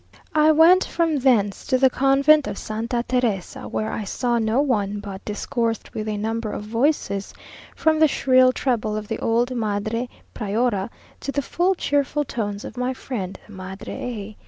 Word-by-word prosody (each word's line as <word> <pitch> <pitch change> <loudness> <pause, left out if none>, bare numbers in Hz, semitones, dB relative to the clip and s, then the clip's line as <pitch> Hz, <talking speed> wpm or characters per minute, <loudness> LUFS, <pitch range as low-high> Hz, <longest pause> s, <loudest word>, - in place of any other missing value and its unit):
I 310 0 +5
went 335 +4 +6
from 330 -3 0
thence 220 -7 +2
to 260 - +3
the 260 0 +4
convent 275 +3 +4
of - - -4
Santa 230 +3 -3
Teresa, 240 -7 -1
where 215 - -2
I 220 - -3
saw 240 +3 0
no 225 +3 +1
one, 210 -8 0
but 200 -2 -8
discoursed 230 +1 -2
with 215 0 -4
a 210 -1 -2
number 220 +1 -2
of - - -5
voices, 225 -3 -1 0.4
from 315 -1 +2
the 315 - +6
shrill 255 -2 +4
treble 230 -5 -1
of 215 -1 -5
the 225 - -3
old 240 +3 +1
Madre 220 +2 -2 0.2
Priora, 210 -1 -1 0.3
to 275 - -4
the 285 0 -1
full 360 +6 +1
cheerful 290 -2 0
tones 205 -4 -4
of - - -9
my 250 +1 -1
friend 200 -9 -5
the 210 - -14
Madre 190 +1 -7
A 215 -4 -6
235 Hz, 175 wpm, -23 LUFS, 210-270 Hz, 0.4 s, went